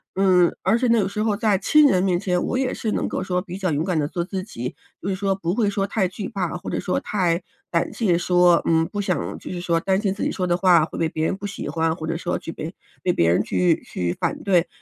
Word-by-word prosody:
嗯， 185 -3 +4
而 225 - +3
且 250 0 +1
那 230 -2 +4
个 195 - 0
时 210 +2 -2
候 210 -2 +1
在 215 -3 +2
亲 300 +9 +5
人 185 -7 +3
面 180 -2 +2
前， 180 -2 0
我 - - -1
也 255 -1 0
是 220 - -2
能 - - -1
够 - - -3
说 180 -1 -1
比 180 0 -7
较 185 -4 -1
勇 145 +1 0
敢 180 -3 0
地 150 -1 0
做 170 -1 -2
自 185 0 -4
己， 125 - -6 0.3
就 - - -5
是 195 - 0
说 195 0 0
不 180 0 -2
会 215 -4 +2
说 200 -1 -1
太 200 -1 0
惧 195 +1 -5
怕， 180 -2 -3
或 - - -7
者 - - -2
说 180 - 0
太 180 -4 0 0.3
胆 170 - 0
怯 190 -7 +2
说， 175 -1 +4
嗯， 165 0 +3
不 205 - -4
想 195 -3 -2
就 - - -9
是 175 - -4
说 170 -2 +1
担 190 +3 +1
心 195 -3 0
自 205 - -8
己 - - +1
说 185 - -2
的 175 0 +1
话 180 -4 +5
会 155 - -5
被 165 - +2
别 155 0 -3
人 190 +4 0
不 205 - -5
喜 200 - -6
欢， 165 0 0
或 160 - -6
者 165 - -1
说 175 +1 -2
去 165 - -7
被 160 +3 -7 0.3
被 180 - +1
别 85 0 +3
人 90 - +3
去 175 -3 +1
去 90 -1 -2
反 - - -2
对。 180 -3 +3
180 Hz, 300 characters per minute, -23 LUFS, 170-200 Hz, 0.3 s, 亲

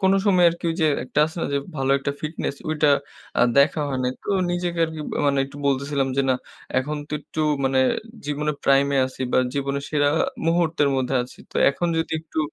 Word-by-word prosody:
কোনো 190 0 +4
সময় 180 -3 +5
আরকি 170 +1 -9
ঐযে 165 -1 +1 0.2
একটা 135 - -3
আছে 160 - -10
না - - -1
যে, 140 - +2 0.2
ভালো 135 0 0
একটা 140 +1 -2
ফিটনেস, 155 -2 -3 0.2
ঐটা 150 -1 +2 0.5
আ - - +4 0.2
দেখা 150 +2 +4
হয় 130 -2 -2
নাই। 125 0 0
তো - - -11 0.2
নিজেকে 175 -1 -2
আরকি 160 -1 -6 0.2
আ - - +1
মানে 140 -1 +2
একটু 140 +1 -12
বলতেছিলাম 140 0 0
যে, 140 - +3
"না, - - +4 0.4
এখন 150 +3 -2
তো - - -10
একটু 155 - -6 0.2
মানে 135 0 +2 0.5
জীবনে 150 +1 -1
prime 140 0 +4
এ - - +2
আছি 130 - -12
বা, - - +4 0.2
জীবনের 140 0 -2
সেরা 145 -1 +2
আ - - +4 0.2
মুহূর্তের 165 -3 +2
মধ্যে 130 0 -1
আছি। 125 - -12
তো - - -6
এখন 175 +5 -2
যদি 160 - -2
একটু 160 0 -7
145 Hz, 210 wpm, -23 LUFS, 140-160 Hz, 0.5 s, সময়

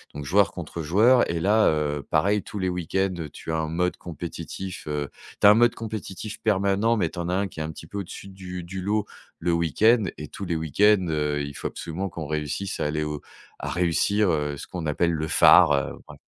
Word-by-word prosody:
donc, 75 0 -6
joueur 95 +5 +3
contre 85 -1 -6
joueur, 110 +11 +4
et 85 -1 -1
là, 105 +5 +4
heu, 75 -2 -1
pareil, 100 +6 +2
tous 105 - -8
les 95 -1 -1
week-ends, 90 +2 -1 0.2
tu - - -7
as 80 - 0
un 80 -1 -1
mode 90 +3 0
compétitif, 85 +2 -7
heu 75 -3 -2 0.3
tu - - +2
as 105 - +10
un - - +8
mode 120 +1 +4
compétitif 110 -1 -6
permanent, 105 +2 +2
mais 85 -6 0
tu 90 - -7
en 85 0 -3
as 90 - +1
un 100 +1 0
qui 85 - -11
est - - -1
un 80 - -4
petit 80 - -11
peu 100 +4 -5
au-dessus 100 +1 -8
du 90 -2 -7
du 95 +2 -6
lot 105 +2 0 0.3
le 90 - -1
week-end, 100 - +3
et 75 -1 -7
tous 100 - -7
les 85 - -1
week-ends, 95 +6 +3
heu, 75 -1 0
il 70 0 -6
faut - - -3
absolument 95 +4 -5
qu'on 80 -2 -6
réussisse 75 +6 -3
à - - 0
aller 75 +1 -1
au 75 -1 -4 0.4
à - - -4
réussir, 90 +3 +2
heu, 75 -2 -1
ce - - -7
qu'on 85 -4 -5
appelle 85 +3 +1
le 80 -1 -2
phare, 75 - +7
heu, 70 -1 -1
bref. - - -12
90 Hz, 230 wpm, -25 LUFS, 80-100 Hz, 0.4 s, as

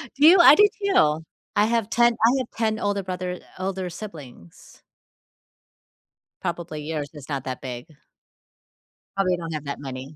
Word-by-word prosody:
Do 290 +3 +6
you? 350 +2 +8
I 340 - +9
do 415 +6 +6 0.2
too! 160 - +2 0.3
I 205 - +4
have 225 -1 0
10 235 0 +4
I 230 - +6
have 255 -3 -2
10 220 -1 0
older 205 -1 -1
brother 180 -1 -5 0.2
older 185 -1 -3
siblings. 155 - -12 1.6
Probably 170 -3 -4
yours 150 -2 -4
is 145 -2 -12
not 140 -3 -3
that 130 -1 -5
big. 125 0 -6 1.3
Probably 185 -2 +1
don't 165 -1 -6
have 155 -1 -5
that 140 - -5
many. 135 +1 -8
180 Hz, 155 wpm, -24 LUFS, 150-215 Hz, 1.6 s, I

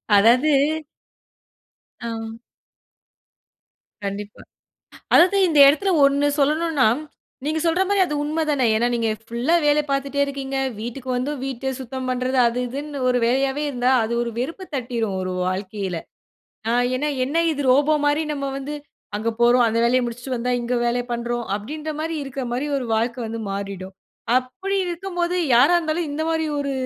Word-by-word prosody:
அதாவது 240 +9 +5 1.5
ஆ. 225 -1 -5 1.7
கண்டிப்பா. 205 +1 -6 0.7
அதாவது 370 +4 +6
இந்த 310 -4 +2
இடத்துல 380 +7 +3
ஒண்ணு 280 +1 +3
சொல்லணுனா, 300 -2 +2 0.6
நீங்க 310 +2 0
சொல்றமாரி 380 +4 +2
அது 300 - -4
உண்ம 315 +2 -1
தானே! 275 -4 +2
ஏனா, 235 +2 +2
நீங்க 230 -1 0
ஃபுல்லா 240 +9 0
வேலை 295 0 +4
பாத்துட்டே 275 0 -1
இருக்கீங்க. 275 -1 -4 0.2
வீட்டுக்கு 245 +3 -6
வந்தும், 265 +2 -2
வீட்ட 265 0 -3
சுத்தம் 260 0 -5
பண்றது 255 +1 -1
அது, 235 +1 -2
இதுன்னு 285 +2 -5
ஒரு 250 0 +3
வேலையாவே 270 +4 +1
இருந்தா, 250 -1 +1
அது 225 +2 -2
ஒரு 235 - -4
வெறுப்பு 330 +9 -4
தட்டிரும். 235 -6 -2
ஒரு 185 0 -3
வாழ்க்கையில. 190 -1 -3 0.7
ஆ - - +2 0.2
ஏன்னா, 295 +4 -1 0.2
என்ன 285 +5 -3 0.2
இது 285 -1 -3
ரோபோமாரி 290 +2 +3
நம்ம 280 -1 -4
வந்து 285 +2 -5 0.4
அங்க 225 +2 -1
போறோம், 240 +1 +5
அந்த 225 - 0
வேலைய 250 +2 +3
முடிச்சிட்டு 245 +2 -4
வந்தா, 250 +2 -1
இங்க 240 +1 -2
வேலைய 240 +1 0
பண்றோம். 240 0 -2
அப்பிடின்றமாரி 310 +8 -4
இருக்கமாரி 265 0 -3
ஒரு 250 - -4
வாழ்க்க 235 +2 -1
வந்து 225 +1 -5
மாறிடும். 195 -1 -5 0.4
அப்பிடி 375 +11 -2
இருக்கும்போது 350 0 -2 0.2
யாரா 275 +9 +6
இருந்தாலும், 325 -1 -1
இந்தமாரி 320 +2 -1
ஒரு 280 -1 -2
265 Hz, 140 wpm, -22 LUFS, 235-300 Hz, 1.7 s, அதாவது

